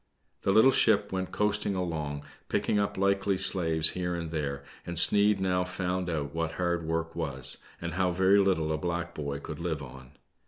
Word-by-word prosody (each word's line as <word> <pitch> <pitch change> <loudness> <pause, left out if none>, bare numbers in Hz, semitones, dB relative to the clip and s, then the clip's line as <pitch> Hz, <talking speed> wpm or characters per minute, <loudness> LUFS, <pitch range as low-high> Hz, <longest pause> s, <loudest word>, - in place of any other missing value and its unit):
The 95 - 0
little 110 +6 +5
ship 105 -4 +2
went 95 -1 -4
coasting 105 -1 -1
along, 75 -5 -4 0.3
picking 105 - 0
up 100 - -2
likely 100 0 0
slaves 80 -4 +3
here 90 -1 -3
and 85 -2 -6
there, 70 -3 -4 0.2
and 85 -1 -4
Sneid 105 +3 +7
now 90 -1 0
found 90 0 -3
out 75 -4 -4
what 80 0 -3
hard 85 -2 -2
work 80 0 -3
was, 70 -6 0 0.2
and 85 -1 -5
how 90 +1 0
very 95 +3 +3
little 90 -6 +1
a 80 - -2
black 85 +1 -4
boy 70 -2 -5
could 75 +1 -8
live 80 -4 -4
on. 65 0 -13
85 Hz, 185 wpm, -28 LUFS, 80-95 Hz, 0.3 s, Sneid